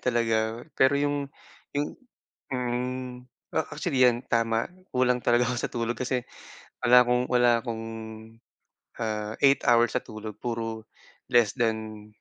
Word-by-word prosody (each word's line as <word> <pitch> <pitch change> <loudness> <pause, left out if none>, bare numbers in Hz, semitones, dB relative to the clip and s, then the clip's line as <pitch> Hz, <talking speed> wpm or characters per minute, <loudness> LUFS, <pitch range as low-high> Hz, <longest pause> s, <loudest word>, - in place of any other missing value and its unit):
talaga 115 -2 +1 0.2
ako - - -9
eh. - - -25
Pero 130 +1 +5
'yung, 145 0 +1 0.6
'yung 145 - +1 0.7
mm. 125 0 -3 0.3
A 160 - +2
actually 150 -3 -1
yan, 120 0 +4
tama. 115 0 +1 0.2
Kulang 125 -1 +2
talaga 120 +1 +3
ako 125 - -1
sa - - -2
tulog 120 0 -2
kasi 125 -1 -2 0.6
wala 125 +1 +8
akong 125 0 +2
wala 120 -1 +5
akong, 115 -2 -4 1.1
ah, 105 -1 -3
8 140 0 +5
hours 120 -1 +5
sa - - +2
tulog, 110 -1 -9
puro 115 -2 -4 0.4
;less 120 -4 +4
than 110 -2 -2
120 Hz, 145 wpm, -27 LUFS, 115-125 Hz, 1.1 s, wala